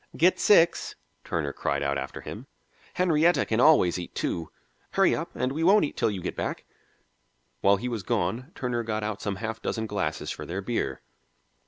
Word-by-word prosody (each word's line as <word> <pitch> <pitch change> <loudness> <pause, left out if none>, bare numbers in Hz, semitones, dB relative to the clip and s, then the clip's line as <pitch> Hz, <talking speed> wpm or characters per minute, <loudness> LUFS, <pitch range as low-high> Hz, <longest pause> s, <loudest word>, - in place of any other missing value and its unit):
"Get 175 +5 +4
six," 170 -5 +4 0.3
Turner 75 -3 -2
cried 70 0 -1
out 70 0 0
after 70 0 -5
him. - - -8 0.5
"Henrietta 175 -1 +3
can 110 - 0
always 125 - +5
eat 85 - -8
two. 85 -2 -2 0.4
Hurry - - +4
up, - - -3
and 125 +1 -1
we 155 +4 -2
won't 195 0 +6
eat - - -6
till - - +1
you 100 -3 -4
get - - -3
back." - - -4 0.9
While 100 0 +4
he 120 +6 -4
was 115 -4 -3
gone 95 +8 -2
Turner 125 -2 -2
got 110 -2 -3
out 105 0 -3
some 100 -2 -2
half 110 +2 -5
dozen 110 -1 -2
glasses 80 -8 -2
for - - -6
their 90 +3 -4
beer. 95 - -2
110 Hz, 185 wpm, -27 LUFS, 90-130 Hz, 0.9 s, won't